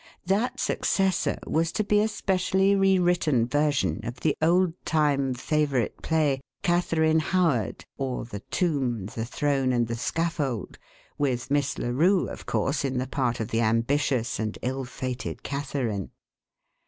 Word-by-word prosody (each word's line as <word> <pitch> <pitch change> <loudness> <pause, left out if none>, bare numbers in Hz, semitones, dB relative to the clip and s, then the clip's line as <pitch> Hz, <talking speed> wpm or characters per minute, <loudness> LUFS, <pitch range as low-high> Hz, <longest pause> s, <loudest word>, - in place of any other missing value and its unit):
That 200 +7 0
successor 190 -2 +1
was 165 +1 0
to 215 - 0
be 205 0 +3
a 215 - +2
specially 190 -1 +1
rewritten 175 -9 +3
version 135 - +1
of 120 +2 -6
the 155 - +2
old 175 +2 +3
time 140 -4 +1
favourite 140 -3 0
play 150 -5 +1 0.2
Catharine 160 -2 +2
Howard; 155 - 0
or, 130 -3 -2
The 105 -3 -7
Tomb, 135 - 0
the 110 +3 -4
Throne, 135 +1 0
and 120 -1 +2
the 115 - -4
Scaffold, 145 - -2 0.4
with 135 -2 -1
Miss 145 -1 +1
Larue, 165 +11 +2
of - - -9
course, 140 +1 0
in 135 -2 -1
the 125 - 0
part 125 -2 -1
of 110 0 -3
the 115 0 +1
ambitious 120 +2 +1
and 110 -1 -2
ill 130 +2 -2
fated 130 0 -5
Catharine. 135 -8 -3
140 Hz, 140 wpm, -26 LUFS, 125-165 Hz, 0.4 s, be